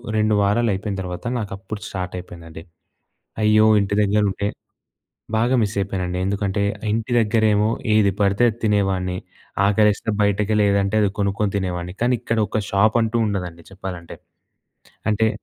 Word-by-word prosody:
2 110 0 +2
వారాలు 110 +4 +2
అయిపోయిన 100 +1 -3
తర్వాత 90 +3 -6
నాకు 105 -4 -4
అప్పుడు 100 +2 -8
స్టార్ట్ 90 -2 -5
అయిపోయిందండి. 85 -3 -10 0.8
అయ్యో! 110 0 +5
ఇంటి 100 0 -1
దగ్గర 105 +1 +2
ఉంటే 100 +1 -2 0.9
బాగా 120 +4 +2
మిస్ 105 -1 -1
అయిపోయానండి. 90 -2 -2
ఎందుకంటే 100 +1 -1 0.3
ఇంటి 115 +3 -2
దగ్గరేమో 110 -1 +2 0.2
ఏది 105 -2 +4
పడితే 100 +3 +2
అది 110 - -7
తినేవాడిని. 95 -3 +1 0.5
ఆకలేస్తే 105 +1 +2
బయటకెళ్ళి 105 +1 +2
ఏదంటే 100 +1 +1
అది 100 - +3
కొనుక్కొని 100 0 0
తినేవాడిని. 90 -1 -4
కానీ 125 +1 +3
ఇక్కడ 115 - -2
ఒక 110 - -1
షాప్ 105 +3 +3
అంటూ 115 +1 0
ఉండదండి 90 -4 -4
చెప్పాలంటే. 90 -3 -8 0.9
అంటే 110 +1 +2
100 Hz, 140 wpm, -21 LUFS, 95-110 Hz, 0.9 s, అయ్యో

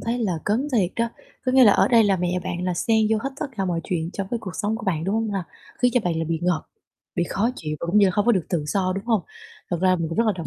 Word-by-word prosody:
thấy 235 +2 -2
là 215 -6 0
cấn 235 +8 0
thiệt 195 -7 +2
đó. 230 0 +1 0.4
Có 255 - +2
nghĩa 260 -1 +7
là 205 - +7
ở - - +3
đây 230 -3 +5
là 200 -2 +3
mẹ 180 0 -1
bạn 180 -1 -3
là 180 - 0
xen 220 +4 +2
vô 220 - +3
hết 270 - -2
tất - - -1
cả 195 - 0
mọi 175 -2 -1
chuyện 165 -2 -2
trong 195 - -3
cái 240 - -1
cuộc 200 - -6
sống 215 +3 -1
của 215 - -8
bạn, 165 -4 0
đúng 195 +3 0
hông 225 -1 0
ha? 195 -3 -2 0.4
Khiến 245 - +5
cho 250 - +4
bạn 175 -2 0
là 165 - -1
bị 165 0 -1
ngộp, 175 -3 +1 0.5
bị 175 - +2
khó 220 +5 +1
chịu 150 -1 -4
và - - -3
cũng 190 +5 +3
như 200 - +6
là - - +2
hông 205 +1 +1
có 240 - +6
được 185 -7 0
tự 165 -5 -1
do, 185 +3 0
đúng 195 +1 -5
hông? 225 -4 +2 0.5
Thật 175 - +1
ra 185 0 +4
mình 165 -2 -2
cũng 165 - -5
rất 230 - +3
là 215 - +3
đồng 165 - -4
195 Hz, 325 wpm, -23 LUFS, 175-225 Hz, 0.5 s, nghĩa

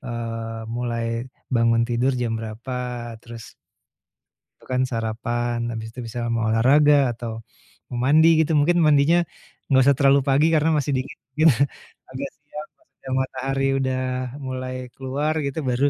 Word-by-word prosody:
eee, 115 -3 -5
mulai 115 0 -3 0.2
bangun 115 -1 +3
tidur 125 +2 0
jam 120 -2 -1
berapa, 120 +1 -5
terus 115 -1 -11 1.1
tentukan 130 0 -1
sarapan, 120 0 -2
habis 110 0 -6
itu 120 +1 -8
misalnya 120 +1 -4
mau 115 -1 0
olahraga 140 +3 +5
atau 115 -1 -6 0.5
mau 120 - -5
mandi 160 +3 +5
gitu. 160 - -1
Mungkin 155 +4 +3
mandinya, 155 +4 +4 0.4
enggak 130 -2 +4
usah 140 - +4
terlalu 140 0 +4
pagi, 145 +4 +2
karena 155 +1 +3
masih 145 -1 -1
dingin 135 - -11 0.2
dingin. 155 +2 +5 0.6
Agak 135 +1 -6 0.2
siang 150 +1 -8
pas 325 - -33 0.2
ada 135 - -9
matahari 135 +1 -1 0.2
udah 130 0 -1 0.3
mulai 130 -2 -5 0.2
keluar 140 +4 -2
gitu, 140 +1 -3
baru 130 +3 +2
130 Hz, 145 wpm, -23 LUFS, 115-140 Hz, 1.1 s, olahraga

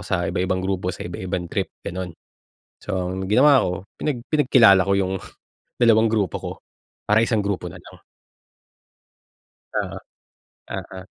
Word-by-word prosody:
sa 90 -1 -1
iba-ibang 95 +1 -1
grupo 95 -1 -1
sa 90 - -5
iba-ibang 90 0 -4
trip, - - -1 0.2
gano'n. 90 0 -4 0.7
So, 95 -2 -2 0.2
ang 95 +1 -4
ginawa 135 +5 +6
ko, 90 - 0 0.2
pinag 145 -5 -2
pinagkilala 125 -10 +5
ko 100 +2 0
yung 95 0 0 0.6
dalawang 115 -2 +4
grupo 105 -5 0
ko - - -6 0.5
para 105 +1 +3
isang 115 -2 +2
grupo 100 -3 -2
na 90 +1 -8
lang. - - -14 1.8
Oo. - - -2 0.7
Oo. 95 - -6
95 Hz, 135 wpm, -23 LUFS, 95-115 Hz, 1.8 s, ginawa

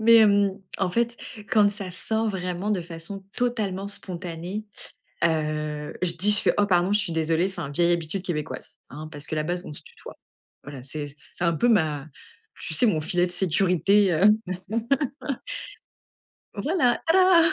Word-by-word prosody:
Mais 230 +1 +7
hem, 200 -3 +4 0.2
en 190 -2 +1
fait, 235 +3 0 0.3
quand 205 -2 +5
ça 200 -3 -5
sort 220 +4 0
vraiment 185 +1 -3
de 200 - +1
façon 170 +3 -7
totalement 210 -6 -1
spontanée, 180 +1 -5 0.6
heu, 150 -2 -1
je 175 -2 +2
dis 190 +5 +3
je 210 - +7
fais: - - +2
«oh 205 - +4
pardon, 180 -1 +2
je 210 - +4
suis 175 -5 -1
désolée, 160 +2 +1
enfin 175 -6 -5
vieille 170 +4 +3
habitude 170 +3 -3
québécoise, 155 -5 -4 0.2
hein, 150 +4 -8
parce 145 -1 -3
que - - -3
là-bas 155 +3 -1
on - - -8
se - - -7
tutoie». - - -13 0.5
Voilà, 140 -3 -8
c'est 145 +1 -6 0.2
c'est - - -5
un 170 - +3
peu 240 +10 +2
ma 155 -9 +2 0.5
tu 160 - -5
sais, 165 - +4
mon 195 -9 +2
filet 175 +3 +1
de 175 - -8
sécurité, 185 +2 +3
heu, 165 +5 +3 2.3
voilà, 250 - +1
tada. 345 -1 +6
180 Hz, 165 wpm, -25 LUFS, 160-205 Hz, 2.3 s, Mais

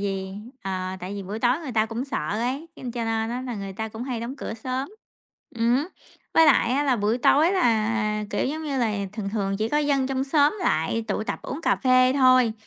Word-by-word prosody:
vì, 195 -1 -3 0.3
ờ, 185 -1 -3
tại 185 +3 -5
vì 200 - -5
buổi 200 +4 -5
tối 245 +4 +2
người 275 -6 -6
ta 220 0 +2
cũng 235 +3 -4
sợ 155 - -3
ấy, 250 +9 -2
nên 250 - -6
cho 235 -2 -3
nên 225 0 -1
á, 250 +1 -3
là 245 -2 -4
người 195 -1 -5
ta 220 +3 -4
cũng 220 +1 -7
hay 250 -3 -3
đóng 245 +4 -5
cửa 220 - -5
sớm, 255 +4 -3 0.7
ừm 235 +2 +3
hứ. 290 +6 -1 0.5
Với 325 - +7
lại 235 - +4
á 280 - +2
là 265 -3 +2
buổi 215 +3 0
tối 310 +8 +4
là, 220 - +1
kiểu - - 0
giống 310 +4 -3
như 280 -3 -2
là, 225 -4 +1 0.2
thường 210 -3 -4
thường, 195 -2 -1
chỉ 220 +2 -1
có 295 - +1
dân 280 -3 +1
trong 265 0 -1
xóm 295 +6 +3
lại 225 - 0
tụ - - -1
tập, - - -3
uống 285 - -5
cà - - +2
phê 255 0 +4
thôi, 255 -4 +5
235 Hz, 235 wpm, -25 LUFS, 215-265 Hz, 0.7 s, Với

